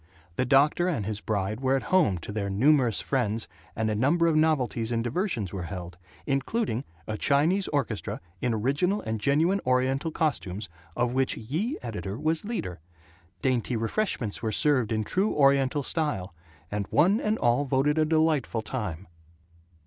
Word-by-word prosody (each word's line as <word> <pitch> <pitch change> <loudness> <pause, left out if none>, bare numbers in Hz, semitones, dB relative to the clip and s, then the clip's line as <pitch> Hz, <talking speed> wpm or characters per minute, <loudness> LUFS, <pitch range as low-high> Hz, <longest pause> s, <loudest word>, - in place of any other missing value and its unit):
The 130 - 0
doctor 145 +6 +4
and 145 - -1
his 105 0 -3
bride 105 +1 -2
were 135 0 +2
at 135 - -1
home 160 - +4
to 105 - -6
their 100 -1 -2
numerous 125 +3 +3
friends 115 -5 -1 0.3
and 110 0 0
a 110 - 0
number 145 +10 +2
of 165 -2 +3
novelties 135 -7 +1
in 115 -1 0
diversions 120 - -2
were 90 -3 -4
held, 90 -2 -7 0.3
including 135 - -1 0.2
a 110 -1 -4
Chinese 165 +8 +2
orchestra 135 -8 -2 0.2
in 125 - +1
original 140 - +1
and 110 0 -3
genuine 160 - +2
Oriental 130 +4 +1
costumes, 105 - -2 0.3
of 120 0 +1
which 130 0 +1
Ye 160 - -2
Editor 105 -3 -5
was 160 +3 0
leader. 100 - -4 0.6
Dainty 125 -2 +1
refreshments 115 - -1
were 110 -1 -1
served 130 -5 +2
in 110 -1 0
true 190 - 0
Oriental 140 0 +3
style, 110 - -2 0.4
and 105 -1 -2
one 185 +9 +3
and 215 +1 0
all 120 +4 +2
voted 140 +3 +1
a - - +5
delightful 155 -7 +1
time. 105 -8 -4
130 Hz, 160 wpm, -27 LUFS, 110-155 Hz, 0.6 s, a